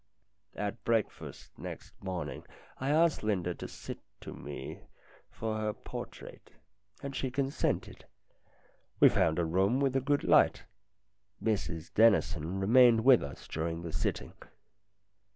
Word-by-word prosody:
At 105 Hz, +2 st, -4 dB
breakfast 115 Hz, -3 st, -2 dB
next -, -, -8 dB
morning 85 Hz, -8 st, -4 dB, 0.4 s
I 135 Hz, -, -2 dB
asked 160 Hz, +2 st, +3 dB
Linda 95 Hz, -5 st, 0 dB
to -, -, -7 dB
sit -, -, -8 dB, 0.2 s
to -, -, -8 dB
me 70 Hz, 0 st, -7 dB, 0.5 s
for 110 Hz, -1 st, -3 dB
her 110 Hz, 0 st, -1 dB
portrait, -, -, -9 dB, 0.5 s
and 140 Hz, -1 st, -5 dB
she 130 Hz, -, -1 dB
consented. 135 Hz, +2 st, -2 dB, 0.9 s
We -, -, +8 dB
found 80 Hz, -1 st, +2 dB
a 85 Hz, -, +1 dB
room 95 Hz, +9 st, +2 dB
with 135 Hz, -2 st, +1 dB
a 135 Hz, -, +3 dB
good 145 Hz, +2 st, +1 dB
light. -, -, +4 dB, 0.8 s
Mrs 90 Hz, -7 st, -2 dB
Dennison 95 Hz, -5 st, +3 dB
remained 115 Hz, +2 st, +6 dB
with 130 Hz, -3 st, +7 dB
us 70 Hz, -1 st, -8 dB
during 80 Hz, +1 st, -3 dB
the 85 Hz, -2 st, -6 dB
sitting. -, -, -2 dB
105 Hz, 130 wpm, -31 LUFS, 85-130 Hz, 0.9 s, We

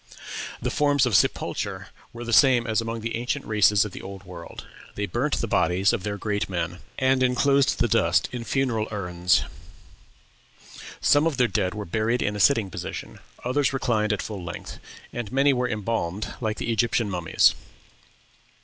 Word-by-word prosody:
The -, -, -2 dB
forms 145 Hz, -2 st, +3 dB
of 120 Hz, -5 st, +1 dB
sepulture 85 Hz, -, 0 dB, 0.2 s
were 120 Hz, 0 st, -8 dB
the 120 Hz, 0 st, -3 dB
same 125 Hz, -2 st, +5 dB
as 110 Hz, 0 st, +1 dB
among 115 Hz, 0 st, -4 dB
the 115 Hz, +1 st, -3 dB
ancient 125 Hz, +4 st, -3 dB
races 105 Hz, -1 st, +4 dB
of 105 Hz, -, -6 dB
the -, -, -9 dB
Old 95 Hz, 0 st, -9 dB
World; 90 Hz, -2 st, -10 dB, 0.3 s
they -, -, -2 dB
burnt -, -, -1 dB
the -, -, -1 dB
bodies 90 Hz, +4 st, +2 dB
of -, -, -1 dB
their 100 Hz, +2 st, -3 dB
great 105 Hz, -1 st, -2 dB
men, 90 Hz, -1 st, -3 dB, 0.2 s
and 130 Hz, 0 st, +2 dB
enclosed 135 Hz, +2 st, +3 dB
the -, -, +2 dB
dust -, -, +2 dB
in 125 Hz, -2 st, -5 dB
funeral 115 Hz, -4 st, 0 dB
urns; 90 Hz, -3 st, +1 dB, 1.6 s
some 145 Hz, +2 st, +4 dB
of 155 Hz, -5 st, -2 dB
their 125 Hz, -, +4 dB
dead 95 Hz, -2 st, -1 dB
were 105 Hz, -1 st, -5 dB
buried 110 Hz, +6 st, 0 dB
in 105 Hz, -, -1 dB
a -, -, -4 dB
sitting 110 Hz, -5 st, +3 dB
position, -, -, -7 dB, 0.2 s
others 135 Hz, +2 st, +1 dB
reclined 110 Hz, -5 st, 0 dB
at 105 Hz, -, -1 dB
full 100 Hz, -4 st, -6 dB
length, 85 Hz, -, -7 dB, 0.3 s
and 120 Hz, -4 st, -5 dB
many 135 Hz, +1 st, +4 dB
were 125 Hz, -1 st, 0 dB
embalmed 105 Hz, -3 st, -2 dB
like 110 Hz, -2 st, -1 dB
the 115 Hz, -, -2 dB
Egyptian 115 Hz, 0 st, +1 dB
mummies. 90 Hz, -4 st, +3 dB
110 Hz, 175 wpm, -25 LUFS, 100-125 Hz, 1.6 s, same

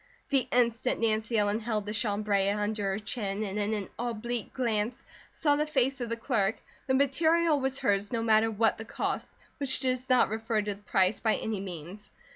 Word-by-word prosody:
The 270 Hz, -3 st, +2 dB
instant 240 Hz, 0 st, +2 dB
Nancy 225 Hz, 0 st, +1 dB
Ellen 205 Hz, +1 st, +2 dB
held 215 Hz, -2 st, -2 dB
the 210 Hz, -, -4 dB
chambray 205 Hz, -2 st, +1 dB
under 205 Hz, 0 st, -1 dB
her 195 Hz, -, -1 dB
chin 210 Hz, -1 st, -3 dB
and 205 Hz, 0 st, -3 dB
in 205 Hz, +1 st, 0 dB
an 205 Hz, -2 st, -4 dB
oblique 235 Hz, -1 st, -3 dB
glance 230 Hz, -2 st, -1 dB, 0.3 s
saw 290 Hz, -2 st, +1 dB
the 300 Hz, +1 st, 0 dB
face 270 Hz, -2 st, +1 dB
of 240 Hz, -, -3 dB
the 230 Hz, -, -1 dB
clerk, 225 Hz, -4 st, +1 dB, 0.3 s
the 260 Hz, -, +3 dB
material 315 Hz, +3 st, +3 dB
was 265 Hz, 0 st, -1 dB
hers 200 Hz, -3 st, 0 dB
no 230 Hz, -2 st, -1 dB
matter 220 Hz, 0 st, +4 dB
what 225 Hz, 0 st, +1 dB
the -, -, -4 dB
cost, -, -, -3 dB, 0.3 s
which 275 Hz, -2 st, 0 dB
does 255 Hz, -1 st, -1 dB
not 255 Hz, -1 st, +5 dB
refer 220 Hz, 0 st, -1 dB
to 205 Hz, 0 st, -2 dB
the 200 Hz, -, -16 dB
price, 190 Hz, 0 st, +2 dB
by 220 Hz, -2 st, +2 dB
any 220 Hz, -3 st, -3 dB
means. 185 Hz, +2 st, -8 dB
220 Hz, 195 wpm, -29 LUFS, 205-250 Hz, 0.3 s, not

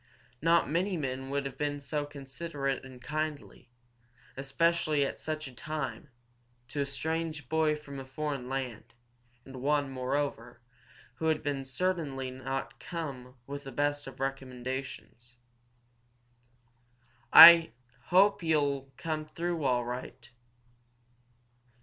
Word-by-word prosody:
Not 165 Hz, +2 st, +4 dB
many 180 Hz, +5 st, 0 dB
men 135 Hz, -2 st, -3 dB
would 140 Hz, 0 st, -1 dB
have 135 Hz, -1 st, -6 dB
been 145 Hz, -1 st, -1 dB
so 145 Hz, +1 st, -3 dB
considerate 140 Hz, 0 st, -4 dB
and 130 Hz, -1 st, -11 dB
so 125 Hz, -, -16 dB
kindly, 155 Hz, -4 st, -4 dB, 0.7 s
especially 150 Hz, +2 st, +1 dB
at -, -, -5 dB
such 155 Hz, -1 st, -4 dB
a 135 Hz, -, -11 dB
time, 140 Hz, -2 st, -5 dB, 0.6 s
to 145 Hz, +2 st, -2 dB
a 140 Hz, -, -1 dB
strange 160 Hz, 0 st, -3 dB
boy 160 Hz, +1 st, +2 dB
from 140 Hz, -2 st, -9 dB
a -, -, -6 dB
foreign 140 Hz, -2 st, -4 dB
land, 125 Hz, -3 st, -5 dB, 0.5 s
and 135 Hz, -1 st, -10 dB
one, 145 Hz, 0 st, +1 dB
moreover, 130 Hz, -2 st, -2 dB, 0.6 s
who 160 Hz, -, -1 dB
had 145 Hz, -4 st, -1 dB
certainly 140 Hz, -4 st, -2 dB
not 135 Hz, +1 st, -5 dB
come 140 Hz, -7 st, -6 dB
with 140 Hz, +1 st, -6 dB
the 135 Hz, -, -8 dB
best 145 Hz, +2 st, -1 dB
of 135 Hz, -, -10 dB
recommendations. 130 Hz, -2 st, -5 dB, 2.0 s
"I 170 Hz, -, +14 dB
I 165 Hz, -4 st, 0 dB, 0.3 s
hope 195 Hz, +3 st, +4 dB
you'll 145 Hz, -4 st, 0 dB
come 155 Hz, -1 st, -3 dB
through 170 Hz, 0 st, -3 dB
all 125 Hz, -2 st, +2 dB
right." 125 Hz, 0 st, -7 dB
140 Hz, 125 wpm, -30 LUFS, 130-155 Hz, 2.0 s, I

